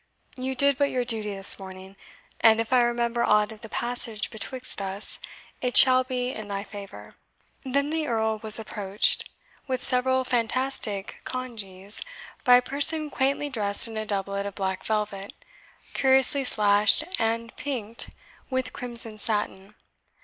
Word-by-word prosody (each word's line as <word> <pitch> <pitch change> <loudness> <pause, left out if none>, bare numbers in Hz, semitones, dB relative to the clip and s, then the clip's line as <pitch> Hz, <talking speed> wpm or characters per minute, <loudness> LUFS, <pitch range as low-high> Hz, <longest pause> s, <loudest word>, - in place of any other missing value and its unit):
You 260 +1 -4
did 280 +1 +3
but 285 0 +2
your 250 -1 -1
duty 215 -4 0
this 195 +1 +2
morning; 190 0 -11 0.4
and 225 0 +5
if 225 +2 -2
I 250 - +5
remember 235 0 0
aught 210 +1 +2
of 220 0 -13
the 225 - -10
passage 235 -3 -1
betwixt 235 +1 -2
us, 195 +1 -3 0.4
it 250 -1 +2
shall 255 -1 +8
be 250 -1 -3
in 215 -4 -8
thy 200 -1 -4
favour." 200 -1 -11 0.5
Then 280 +2 -1
the 320 -1 -2
Earl 220 -1 -1
was 215 -1 +6
approached, 205 -2 +1 0.4
with 255 -1 -3
several 260 +1 +3
fantastic 240 -4 -2
congees, 210 -6 -6 0.4
by 250 -2 +6
a 245 - +5
person 295 +3 +2
quaintly 280 +2 -1
dressed 205 -3 +3
in 225 - -9
a 215 - -3
doublet 200 0 -3
of 200 - -8
black 190 -1 -3
velvet, 210 -2 -3 0.6
curiously 265 +1 +3
slashed 210 +3 +3 0.2
and 230 +1 -2
pinked 235 -6 -4 0.4
with 260 -1 -3
crimson 235 -3 -2
satin. 210 -2 -3
230 Hz, 150 wpm, -25 LUFS, 205-255 Hz, 0.6 s, shall